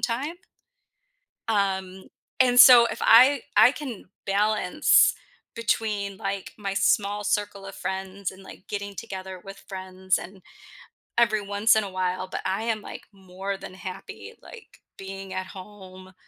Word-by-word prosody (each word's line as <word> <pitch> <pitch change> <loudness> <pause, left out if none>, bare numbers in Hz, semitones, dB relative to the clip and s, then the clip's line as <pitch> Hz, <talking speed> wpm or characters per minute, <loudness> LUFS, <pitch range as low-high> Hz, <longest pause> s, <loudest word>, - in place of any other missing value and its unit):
time. 275 +8 -2 1.1
Um, 190 -3 -1 0.4
and 245 -1 +4
so 245 -3 +10
if - - -6
I 255 +3 +6
I 225 +5 +7
can 260 -9 -8 0.2
balance 210 +2 +3 0.4
between, 210 -3 -2
like, 195 0 -5
my 195 -1 -4
small 205 +1 +1
circle 205 -1 -2
of 195 0 -9
friends 190 0 -5
and, 190 - -15
like, 190 - -13
getting 200 -1 -5
together 190 -4 -8
with 195 0 -11
friends 185 -1 -2
and 190 +1 -11 0.7
every 220 -2 +3
once 205 +3 +3
in 220 - +3
a 200 - -5
while, 185 0 -2
but - - -5
I 195 +4 -2
am, 225 -2 -2
like, - - -9
more 195 0 -6
than 190 - -10
happy, 190 - -9
like, 460 -3 -15 0.2
being 195 0 -8
at 185 0 -4
home 185 -1 -12
200 Hz, 145 wpm, -25 LUFS, 190-220 Hz, 1.1 s, so